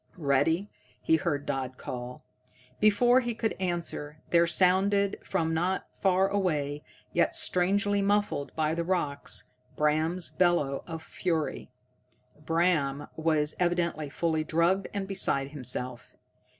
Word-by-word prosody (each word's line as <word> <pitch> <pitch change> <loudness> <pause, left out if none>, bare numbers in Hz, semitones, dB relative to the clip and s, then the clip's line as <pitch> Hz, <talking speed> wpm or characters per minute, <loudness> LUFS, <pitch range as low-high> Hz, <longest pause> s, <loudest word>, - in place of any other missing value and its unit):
"Ready?" 160 +6 +1 0.3
he 160 - +3
heard 145 -1 -2
Dodd 130 -1 -3
call. 125 0 -7 0.5
Before 240 +4 +5
he 240 -2 -3
could 225 -1 -1
answer, 170 -4 -3
there 170 0 +5
sounded 195 +3 +2
from 165 -4 -1
not 180 +4 -1
far 190 0 +3
away, 150 -8 -1 0.3
yet - - +2
strangely 200 +3 +1
muffled 205 -7 0
by 155 0 +1
the 170 +1 -1
rocks, 165 -6 -2 0.2
Bram's 155 +4 +1
bellow 175 -7 +1
of 160 -1 -6
fury. 165 -4 -2 0.7
Bram 155 -4 +1
was 155 -2 +1
evidently 170 -4 0
fully 160 +1 0
drugged 170 +5 +1
and 200 -1 -3
beside 140 -8 0
himself. 125 -3 -4
170 Hz, 120 wpm, -28 LUFS, 150-190 Hz, 0.7 s, Before